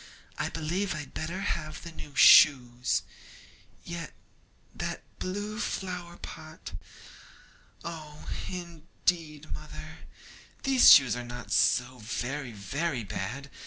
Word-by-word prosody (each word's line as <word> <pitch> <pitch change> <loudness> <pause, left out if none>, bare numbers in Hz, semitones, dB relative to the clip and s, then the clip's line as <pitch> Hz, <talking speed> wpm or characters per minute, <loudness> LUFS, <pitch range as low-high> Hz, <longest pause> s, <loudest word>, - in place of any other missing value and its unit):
I - - 0
believe 170 +3 -2
I'd 150 -3 -7
better 170 +5 -4
have 155 -6 -3
the 170 - -7
new 145 -3 -11
shoes. 125 -4 +6 0.8
Yet, 170 -3 -6 0.6
that - - -4 0.2
blue 205 +4 -4
flower 180 -5 -4
pot. 155 0 -9 1.1
Oh, 155 -3 -8 0.2
indeed, 165 -2 -3
mother, 155 +1 -9 0.6
these 265 -2 +7
shoes 130 -5 +8
are 125 - -4
not 120 0 -8
so 125 +1 +3
very 125 +4 -4
very 125 - -2
bad! 125 +8 -5
155 Hz, 105 wpm, -29 LUFS, 130-170 Hz, 1.1 s, shoes